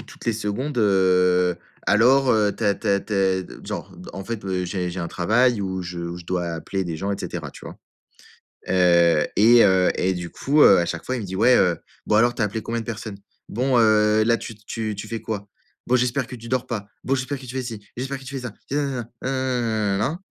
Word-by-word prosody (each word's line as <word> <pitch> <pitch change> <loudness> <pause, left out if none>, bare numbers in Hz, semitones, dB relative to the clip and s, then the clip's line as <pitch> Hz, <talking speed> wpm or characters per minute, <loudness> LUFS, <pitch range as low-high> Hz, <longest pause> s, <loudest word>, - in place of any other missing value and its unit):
toutes - - -13
les 115 - +2
secondes, 120 +7 -3
heu: 90 -3 +3 0.3
«Alors, 130 +5 +4
heu, 105 -2 +2
tu 115 - -3
as 100 - +3
tu - - -5
as 100 0 +3
tu 105 - -8
as» 95 -2 +2
d - - -12 0.2
genre, - - -6
d - - -11
en 95 - -7
fait, 115 -1 -5
heu, 95 -1 -1
j'ai 90 0 -3
j'ai 90 - -6
un 85 - -3
travail 115 +5 +2
où 95 -1 -3
je 90 0 -6
où 85 0 -5
je 90 - -10
dois 90 -1 -1
appeler 85 +3 -3
des 85 -2 -4
gens, 100 +4 -2
et - - -4
cetera, - - -5
tu - - -13
vois? - - -9 0.9
Heu, 85 -4 +4
et 115 +3 +7
heu, 95 -2 +4
et 95 +1 0
du 90 -2 -5
coup, 145 - 0
heu, 100 - +8
à 85 - +2
chaque 85 -1 -5
fois 130 - -1
il 120 - -4
me - - -6
dit: 95 0 -5
«Ouais, 125 +5 +5
heu, 90 -3 +3 0.3
bon 105 - +2
alors, 120 +2 +4
tu 120 - -2
as - - +4
appelé 105 +2 -3
combien 115 +2 -3
de - - -12
personnes? 110 -3 -6 0.3
Bon, 125 +3 +1
heu, 110 -1 +4
là, 115 +1 +3
tu 115 - -8
tu 110 +1 -5
tu 105 +2 -7
fais 115 -1 -5
quoi? 105 -2 -5 0.4
Bon, 125 - +3
j'espère 125 +1 0
que 125 - -8
tu 115 0 -11
dors 130 0 -1
pas. 105 -5 -4 0.2
Bon, 135 - 0
j'espère 135 +1 -3
que 130 - -10
tu 125 - -8
fais 130 - -1
ci, 115 -4 -6 0.2
j'espère 135 +2 -4
que 135 - -14
tu 135 +2 -8
fais - - -8
ça, 115 - -7 0.2
et - - -2
nanana, 135 -5 -2
nanananananana». 120 - -1
105 Hz, 250 wpm, -23 LUFS, 95-120 Hz, 0.9 s, heu